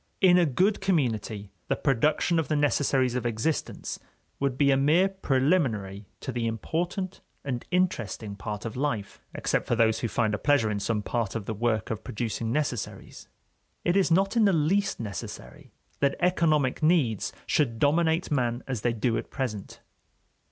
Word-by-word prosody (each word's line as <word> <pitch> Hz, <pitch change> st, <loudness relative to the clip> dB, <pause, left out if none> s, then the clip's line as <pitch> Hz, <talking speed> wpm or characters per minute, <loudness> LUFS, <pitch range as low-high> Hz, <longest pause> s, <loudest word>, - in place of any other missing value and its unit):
In 180 Hz, -2 st, +6 dB
a 175 Hz, -, +4 dB
good 190 Hz, -, +1 dB
community 115 Hz, -, -1 dB, 0.2 s
the -, -, +1 dB
production 150 Hz, +5 st, +2 dB
of 160 Hz, -, -1 dB
the 155 Hz, -, 0 dB
necessaries 135 Hz, -3 st, +2 dB
of 125 Hz, -, -2 dB
existence 120 Hz, +6 st, -2 dB, 0.4 s
would 140 Hz, -2 st, 0 dB
be 140 Hz, -1 st, +4 dB
a -, -, +5 dB
mere 155 Hz, +8 st, +4 dB
preliminary 130 Hz, -, 0 dB
to -, -, -4 dB
the 120 Hz, -2 st, -1 dB
important 175 Hz, -, -3 dB, 0.2 s
and 125 Hz, -4 st, -3 dB
interesting 120 Hz, -, -1 dB
part 105 Hz, +1 st, -6 dB
of 115 Hz, -, -5 dB
life, 125 Hz, -7 st, -3 dB
except -, -, -1 dB
for 120 Hz, -, +2 dB
those 110 Hz, -1 st, +3 dB
who 120 Hz, -, -1 dB
find 110 Hz, -1 st, 0 dB
a 105 Hz, -, -1 dB
pleasure 140 Hz, -7 st, +2 dB
in 100 Hz, -, -1 dB
some 105 Hz, 0 st, -1 dB
part 115 Hz, -3 st, -2 dB
of 110 Hz, -3 st, -3 dB
the 110 Hz, -, -3 dB
work 110 Hz, -1 st, -1 dB
of 110 Hz, -, -4 dB
producing 115 Hz, +1 st, -3 dB
necessaries. 135 Hz, -4 st, -3 dB, 0.6 s
It 175 Hz, -, +2 dB
is 195 Hz, -2 st, +3 dB
not 195 Hz, +6 st, +2 dB
in 225 Hz, -2 st, +5 dB
the 195 Hz, -, +4 dB
least 175 Hz, +6 st, +1 dB
necessary 95 Hz, -, -7 dB, 0.3 s
that 140 Hz, -1 st, +2 dB
economic 155 Hz, -7 st, +2 dB
needs 155 Hz, -, +2 dB
should 120 Hz, -7 st, +1 dB
dominate 160 Hz, +5 st, +2 dB
man 120 Hz, -3 st, 0 dB
as 130 Hz, -5 st, -3 dB
they 120 Hz, +1 st, +1 dB
do 115 Hz, +1 st, 0 dB
at -, -, -8 dB
present. 110 Hz, -7 st, -5 dB
130 Hz, 170 wpm, -27 LUFS, 110-160 Hz, 0.6 s, In